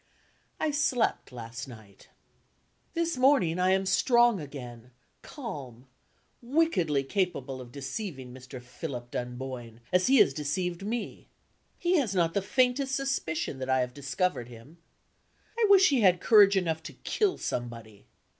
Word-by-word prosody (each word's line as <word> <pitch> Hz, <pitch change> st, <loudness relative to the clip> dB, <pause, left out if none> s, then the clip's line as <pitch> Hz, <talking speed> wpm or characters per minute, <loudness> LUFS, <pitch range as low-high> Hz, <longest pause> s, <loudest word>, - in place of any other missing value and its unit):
I 310 Hz, -, 0 dB
slept 265 Hz, -, 0 dB
last 120 Hz, +1 st, -7 dB
night. 110 Hz, -5 st, -14 dB, 0.9 s
This 335 Hz, -3 st, -1 dB
morning, 255 Hz, -, +3 dB
I 185 Hz, +1 st, +3 dB
am 190 Hz, 0 st, +2 dB
strong 240 Hz, +1 st, +3 dB
again, 125 Hz, -5 st, -9 dB, 0.3 s
calm, 140 Hz, -, -8 dB, 0.6 s
wickedly 235 Hz, -, +1 dB
capable 140 Hz, -6 st, -2 dB
of 120 Hz, -1 st, -11 dB
deceiving 135 Hz, -, -6 dB
Mr. 130 Hz, 0 st, -10 dB
Philip 125 Hz, 0 st, -7 dB
Dunboyne, 125 Hz, -2 st, -6 dB
as 180 Hz, +3 st, +3 dB
he 270 Hz, +1 st, +5 dB
has 140 Hz, -, +5 dB
deceived 170 Hz, +5 st, -3 dB
me. 230 Hz, +3 st, -5 dB, 0.5 s
He 355 Hz, +1 st, +2 dB
has 230 Hz, -, 0 dB
not 165 Hz, -2 st, +2 dB
the 200 Hz, -, +1 dB
faintest 260 Hz, +5 st, +1 dB
suspicion 265 Hz, -, -2 dB
that 130 Hz, 0 st, -5 dB
I 130 Hz, 0 st, +3 dB
have 125 Hz, 0 st, -3 dB
discovered 140 Hz, -1 st, -2 dB
him. 125 Hz, +8 st, -14 dB, 0.8 s
I 445 Hz, -, +4 dB
wish 385 Hz, -2 st, +7 dB
he 270 Hz, -4 st, +2 dB
had 180 Hz, -3 st, +4 dB
courage 200 Hz, -2 st, +6 dB
enough 165 Hz, -4 st, -1 dB
to -, -, -8 dB
kill 410 Hz, -4 st, 0 dB
somebody. 115 Hz, -4 st, -6 dB
165 Hz, 140 wpm, -28 LUFS, -, 0.9 s, wish